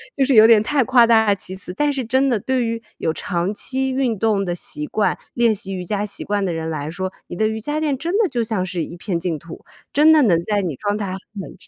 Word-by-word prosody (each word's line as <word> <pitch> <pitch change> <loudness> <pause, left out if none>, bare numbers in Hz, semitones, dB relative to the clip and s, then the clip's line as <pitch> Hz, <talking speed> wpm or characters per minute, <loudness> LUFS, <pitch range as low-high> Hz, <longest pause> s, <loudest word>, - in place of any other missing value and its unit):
就 275 - +2
是 265 -1 +2
有 215 0 +9
点 225 -2 +6
太 275 +4 +1
夸 245 -1 +5
大 220 -3 +4
其 185 -1 -7
词。 180 -1 -8
但 295 +6 +1
是 265 -4 -3
真 260 +4 +2
的 235 -4 +1
对 260 +4 0
于 230 0 -3 0.2
有 160 - -1
长 175 +2 -2
期 265 +5 -2
运 255 -5 0
动 205 -2 +1
的 175 - -2
习 150 -3 -3
惯、 210 +6 0 0.2
练 235 -2 +3
习 195 -1 -4
瑜 180 - -4
伽 205 +3 -2
习 205 - -3
惯 205 -1 -1
的 180 - -1
人 160 0 -4
来 150 -2 -4
说， 185 +2 -4 0.2
你 - - -7
的 215 +4 +1
瑜 220 0 -3
伽 295 +7 -2
垫 300 -3 0
真 335 +6 -3
的 425 -5 +2
就 240 -4 -1
像 215 -4 -1
是 175 -2 -3
一 170 - -8
片 175 0 -3
净 170 -3 -3
土， 170 +1 -12 0.3
真 305 +3 +5
的 310 - +6
能 175 -10 +3
在 205 0 0
你 170 -6 -3
状 205 +8 -2
态 205 -2 -3
很 190 - -4 0.4
差 - - -20
215 Hz, 290 characters per minute, -20 LUFS, 180-255 Hz, 0.4 s, 有